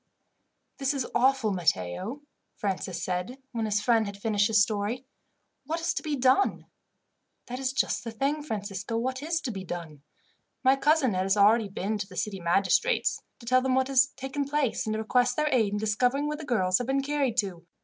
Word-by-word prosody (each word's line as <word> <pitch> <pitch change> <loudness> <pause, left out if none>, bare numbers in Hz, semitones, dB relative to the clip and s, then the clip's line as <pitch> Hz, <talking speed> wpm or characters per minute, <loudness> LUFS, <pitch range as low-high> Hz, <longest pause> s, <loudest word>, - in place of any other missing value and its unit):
"This 275 +1 0
is 265 -3 -1
awful, 250 -3 +3
Matteo," 180 - -1 0.3
Francis 190 -3 -3
said, 180 +8 -3
when 230 -3 -2
his 205 -1 0
friend 225 -1 +3
had 200 0 -7
finished 205 -1 +1
his 215 -1 +3
story. 215 +4 0 0.6
"What 325 +2 -1
is 330 - 0
to - - -3
be 305 -3 -2
done?" 260 +8 +2 0.8
"That 250 +1 -6
is 265 -1 -1
just 265 - 0
the 235 - -5
thing, 275 +7 -1
Francisco. 205 -4 -4
What 255 +3 -2
is 325 +2 -1
to 255 - -3
be 195 -3 -6
done? 165 -5 -7 0.6
My 260 +1 +5
cousin 280 -3 +3
has 190 +2 +1
been 200 - +5
already 215 0 +4
to 205 +1 -3
the - - -12
city 205 -3 -2
magistrates, 195 - +2 0.2
to - - -12
tell 255 +2 +4
them 260 0 +1
what 260 0 +1
has 270 0 +5
taken 270 +2 -3
place, 280 -6 -1
and 215 - 0
to 215 - -2
request 245 +2 +2
their 305 0 +1
aid 220 -5 +2
in - - 0
discovering 245 +7 +1
where 300 0 -2
the 310 - -8
girls 185 -8 +2
have 245 - -3
been 270 +1 +1
carried 275 -4 0
to. 185 -6 -2
235 Hz, 200 wpm, -28 LUFS, 200-270 Hz, 0.8 s, My